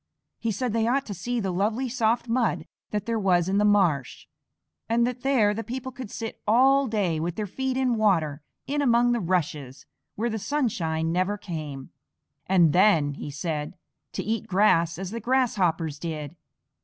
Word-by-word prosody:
He 230 - -2
said 230 +2 -2
they 225 0 +1
ought 270 +3 +1
to 205 - -5
see 240 +7 -3
the 195 -4 -1
lovely 215 +8 0
soft 235 -1 0
mud 235 0 0 0.2
that 210 -1 -3
there 230 0 -1
was 180 -4 +2
in 195 +2 +1
the - - +3
marsh, 185 -11 +2 0.6
and 235 +1 +3
that 250 0 -3
there 240 -7 +3
the 225 +2 -4
people 260 +2 -5
could 250 -3 -8
sit 225 +1 -6
all 265 +5 +4
day 195 -8 0
with 170 +2 -2
their 215 - -2
feet 260 +6 -3
in 260 -2 +2
water 165 -9 +1 0.2
in 290 +1 -1
among 240 -2 +3
the 240 - +1
rushes 150 - -2 0.3
where 235 +3 -1
the 220 - -3
sunshine 165 - -1
never 185 +4 0
came. 155 -8 -7 0.6
"And 175 -5 +4
then," 175 -7 +4
he 145 - -7
said, 150 +2 -4 0.4
"to - - -3
eat 220 0 -2
grass 170 -4 +3
as 190 0 -5
the 230 - -4
Grasshoppers 190 - 0
did! 155 -2 -5
205 Hz, 180 wpm, -26 LUFS, 170-235 Hz, 0.6 s, all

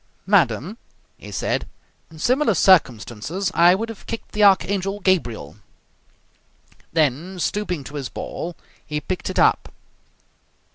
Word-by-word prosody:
"Madam," 200 - +2 0.4
he - - -10
said, - - -2 0.4
"in 160 - -14
similar 245 - +2
circumstances 165 - +2
I 175 +2 +6
would 225 +4 -3
have 225 - -10
kicked 230 - -6
the 210 - +1
Archangel 195 0 +3
Gabriel!" 175 - -1 1.3
Then, 160 +4 0
stooping 180 -5 -2
to 145 - -10
his 140 -4 -4
ball, 175 0 -6 0.3
he 150 -1 -3
picked 180 +5 -4
it - - -5
up. - - +3
180 Hz, 125 wpm, -22 LUFS, 150-200 Hz, 1.3 s, I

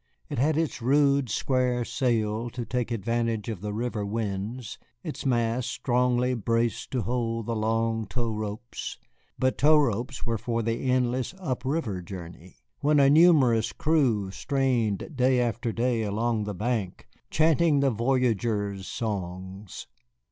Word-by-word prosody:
It 145 - -3
had 150 +3 +2
its 160 -5 -1
rude 140 +1 +3
square 125 +1 +1
sail 115 -2 0
to 120 0 -5
take 125 -1 -2
advantage 115 0 -1
of 105 -6 -5
the 105 0 -3
river 110 0 -2
winds, 105 +2 -4 0.2
its - - -4
mast 120 0 +1
strongly 125 0 +1
braced 115 +1 0
to 125 -3 0
hold 115 0 -1
the 115 0 -2
long 115 0 0
tow 115 +3 -2
ropes. 110 +2 -5 0.4
But 130 0 0
tow 155 +2 +6
ropes 125 -1 0
were 115 -2 -1
for 115 0 -1
the 115 +3 -1
endless 125 +4 0
up 130 -10 -3
river 130 - -1
journey, 90 -1 -10 0.2
when 150 +1 +3
a 140 0 +6
numerous 145 -9 +5
crew 125 -11 +1
strained 125 - -1
day 130 0 +3
after 120 -1 -1
day 120 0 0
along 110 +1 0
the 105 -1 -4
bank, 105 -2 -2 0.2
chanting 160 -1 +3
the 140 -1 +3
voyageurs' 110 -5 0
songs. 95 -2 -5
120 Hz, 140 wpm, -27 LUFS, 110-130 Hz, 0.4 s, tow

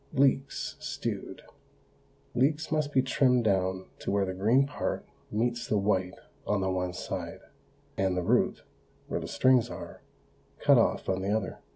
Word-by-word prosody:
LEEKS, 135 0 +1
STEWED. - - -5 0.9
Leeks 145 +5 +1
must 155 -2 0
be 130 -2 +3
trimmed 130 -2 +3
down 95 -2 +1
to - - -4
where 100 0 +2
the 95 - -3
green 115 +9 +3
part 145 - -3 0.2
meets 120 +2 -1
the 105 - +1
white 95 -2 +1 0.3
on 105 - +1
the 95 0 0
one 90 -1 -1
side, 90 - -5 0.6
and 95 -1 +1
the 90 - 0
root, - - +2 0.4
where - - -2
the - - -6
strings 125 0 +3
are, 85 -6 -8 0.6
cut - - +5
off - - +1
on 95 0 0
the 95 - -2
other. 105 -2 -1
105 Hz, 160 wpm, -29 LUFS, 95-130 Hz, 0.9 s, cut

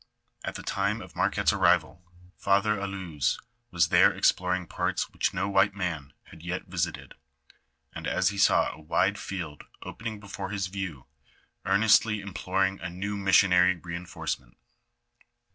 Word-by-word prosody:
At - - -4
the - - -7
time 100 +3 -1
of - - -11
Marquette's - - +2
arrival, 85 - +2 0.3
Father 100 +2 +2
Allouez 95 -7 -2 0.3
was 85 -3 +2
there - - +6
exploring 90 0 +1
parts - - -2
which - - 0
no 95 - -1
white 100 0 +3
man 80 -8 -4
had 80 - -15
yet 90 +2 -4
visited, 90 -2 -3 0.8
and - - -6
as 95 - +2
he 100 0 -5
saw - - +4
a 80 - -13
wide 90 +6 +1
field 85 -7 -6 0.2
opening 110 -2 -6
before 100 -1 -6
his 100 -2 -2
view, 95 -8 -5 0.6
earnestly 105 +1 +4
im 100 -1 -8
ploring 95 +1 0
a 90 - -4
new 100 +4 -4
missionary 95 -2 +4
reinforcement. 85 -7 -6
95 Hz, 145 wpm, -27 LUFS, 90-100 Hz, 0.8 s, there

